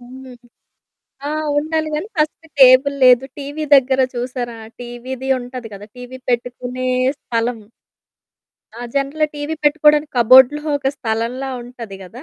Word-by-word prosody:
హ్మ్. 260 +2 -12 1.0
ఆ! - - -3 0.3
ఉండాలి 315 +1 -1
గానీ 310 +7 -3
ఫస్ట్ 310 +1 -1
టేబుల్ 265 +2 +6
లేదు. 250 +1 +6
టీవీ 290 +2 -5
దగ్గర 265 -1 +3
చూసారా, 245 -1 -4 0.2
టీవీది 245 +2 -7
ఉంటాది 245 -1 -8
కదా! 205 +1 -11
టీవీ 250 +1 -9
పెట్టుకునే 245 +1 -3 0.3
స్థలం. 230 0 -2 1.2
ఆ! - - -9 0.2
జనరల్‌గా 280 +3 0
టీవీ 290 +2 -4
పెట్టుకోవడానికి 300 0 +3
కప్‌బోర్డు‌లో 260 +5 +6 0.2
ఒక 270 - -1
స్థలంలా 235 +4 -3
ఉంటది 235 -4 -10
గదా! 230 +8 -12
255 Hz, 125 wpm, -18 LUFS, 245-285 Hz, 1.2 s, టేబుల్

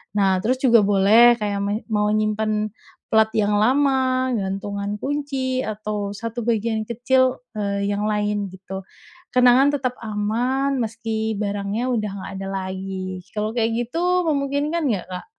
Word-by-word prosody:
Nah 190 -2 +3
terus 245 +7 +1
juga 235 -3 +6
boleh 215 +5 +6
kayak 205 -1 -1
men 200 +1 -1
mau 210 -1 +2
nyimpen 215 0 0 0.4
plat 220 0 +5
yang 205 -1 +2
lama, 260 +1 +2
gantungan 200 +1 -3
kunci 270 -2 -2
atau 210 -1 -3
1 230 +2 -5
bagian 220 -1 0
kecil, 255 +2 +1 0.2
eee, 200 0 -1
yang 205 +1 -1
lain 210 -1 0
gitu. 190 0 -8 0.5
Kenangan 255 +3 +5
tetep 255 -3 -2
aman 245 +6 -1
meski 220 -1 -2
barangnya 205 +4 -2
udah 215 -4 -1
enggak - - -7
ada 195 - -5
lagi, 190 -1 -4 0.2
kalo 210 +1 -1
kayak 230 -1 +1
gitu 355 +7 +1
memungkinkan 290 +3 0
enggak 195 -7 -1
Kak? 180 - -6
215 Hz, 140 wpm, -22 LUFS, 205-255 Hz, 0.5 s, juga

